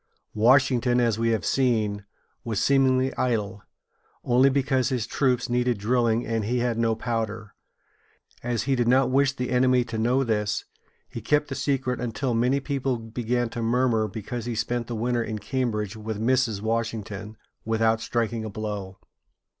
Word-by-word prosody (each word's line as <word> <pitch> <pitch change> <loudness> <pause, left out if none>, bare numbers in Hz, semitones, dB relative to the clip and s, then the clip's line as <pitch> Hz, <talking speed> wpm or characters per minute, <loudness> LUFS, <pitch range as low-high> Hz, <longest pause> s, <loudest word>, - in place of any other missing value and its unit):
Washington, 125 +1 +3
as 115 -3 +1
we 115 0 +1
have 110 -2 0
seen, 110 -6 +1 0.4
was 110 -4 -2
seemingly 130 0 +2
idle, 110 -4 -1 0.6
only 125 +3 +4
because 130 -1 +1
his 125 -5 -1
troops 125 0 0
needed 125 -1 +1
drilling 115 +2 +1
and 115 -1 -1
he 125 +4 0
had 120 -1 0
no 115 -1 +2
powder. 110 -2 -3 0.9
As 120 -2 -1
he 135 0 +1
did 120 -2 0
not 130 +1 +3
wish 140 +1 +3
the 125 -2 -4
enemy 125 0 +3
to 115 -2 -5
know 125 +4 +2
this, 105 -3 -1 0.4
he - - -7
kept 150 0 +1
the - - -3
secret 130 -2 -1
until 120 +2 -2
many 125 +4 +2
people 135 -2 -2
began 120 +2 -2
to 120 - -5
murmur 115 -1 +1
because 110 +3 -6
he 120 -1 -3
spent 115 +2 -2
the 120 - -4
winter 120 +1 0
in 110 -1 -4
Cambridge 105 -2 -2
with 110 -1 -5
Mrs. 115 -3 +1
Washington, 110 -2 -3 0.3
without 115 0 +1
striking 115 -1 -1
a 110 - -4
blow. 100 -2 -5
120 Hz, 160 wpm, -25 LUFS, 110-125 Hz, 0.9 s, only